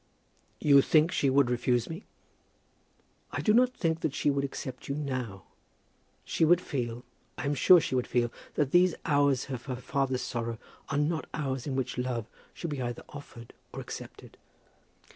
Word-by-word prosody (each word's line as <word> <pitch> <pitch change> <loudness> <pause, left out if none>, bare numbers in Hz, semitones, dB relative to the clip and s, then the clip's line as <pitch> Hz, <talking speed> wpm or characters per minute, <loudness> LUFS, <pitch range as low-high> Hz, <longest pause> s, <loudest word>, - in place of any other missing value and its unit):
"You 140 -2 +6
think 155 +4 +4
she 140 - +2
would 130 -2 +3
refuse 120 -1 +1
me?" 165 +5 -7 1.2
"I - - -4
do 215 - +3
not 250 +2 +4
think 165 -2 0
that 155 -4 -2
she 145 - +2
would 140 0 0
accept 130 -2 -6
you 140 - -2
now. 130 - -4 0.8
She - - 0
would 170 +2 +6
feel, 120 -7 -4 0.3
I - - -4
am 140 - +1
sure 175 +6 +7
she 150 - -3
would 125 -1 +1
feel, 120 -1 +1 0.2
that 145 -3 +1
these 180 0 +5
hours 140 -3 +2
of 125 -2 -5
her 130 - -3
father's 130 +1 -1
sorrow 115 -1 -3 0.3
are 140 - -1
not 155 +2 0
hours 135 -4 -3
in 135 - -2
which 125 -1 -2
love 125 -3 -2 0.3
should 170 - -5
be 140 -3 -3
either 120 -1 -4
offered 135 -5 -11 0.2
or - - -7
accepted. - - -9
140 Hz, 175 wpm, -29 LUFS, 125-150 Hz, 1.2 s, sure